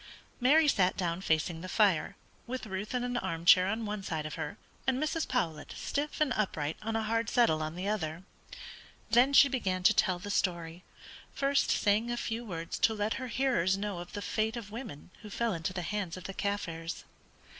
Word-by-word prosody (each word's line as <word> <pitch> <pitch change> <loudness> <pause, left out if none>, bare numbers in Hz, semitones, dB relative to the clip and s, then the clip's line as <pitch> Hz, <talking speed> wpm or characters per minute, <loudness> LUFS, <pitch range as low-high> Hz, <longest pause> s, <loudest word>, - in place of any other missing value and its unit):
Mary 295 +5 +5
sat 185 -9 +3
down 175 -1 -1
facing 160 -1 0
the 185 - -7
fire, 200 -3 +2 0.3
with 255 0 -4
Ruth 205 +3 -4
in 245 - 0
an 245 0 -1
arm 165 -7 -3
chair 185 +1 +7
on 220 +3 -1
one 210 -1 -3
side 160 -5 -3
of 155 - -5
her, 205 - -5 0.3
and 260 -1 +2
Mrs. 310 +3 -1
Powlett 165 - -2
stiff 290 +1 -3
and 300 -4 +2
upright 160 -7 -1
on 225 +1 -3
a 225 - 0
hard 230 +1 0
settle 160 -11 +3
on 155 +1 -3
the 185 +2 -4
other. 170 -5 -2 0.9
Then 250 +4 +5
she 280 0 +8
began 190 -9 -1
to 215 - +6
tell 185 -3 +2
the 205 +3 -6
story, 175 -3 -1 0.5
first 275 0 +2
saying 210 +3 +2
a 240 - -1
few 230 0 -3
words 170 -6 -5
to 220 - +3
let 210 +1 0
her 255 - -4
hearers 230 -8 +1
know 200 -3 -3
of 175 - -9
the 205 -1 -4
fate 220 +1 -1
of 210 -3 -7
women 215 - -8
who 210 - -9
fell 230 +1 -1
into 165 +1 -3
the 180 -1 -4
hands 190 -1 -3
of 185 - -9
the 195 - -6
Kaffirs. 170 -5 -3
205 Hz, 205 wpm, -31 LUFS, 175-235 Hz, 0.9 s, she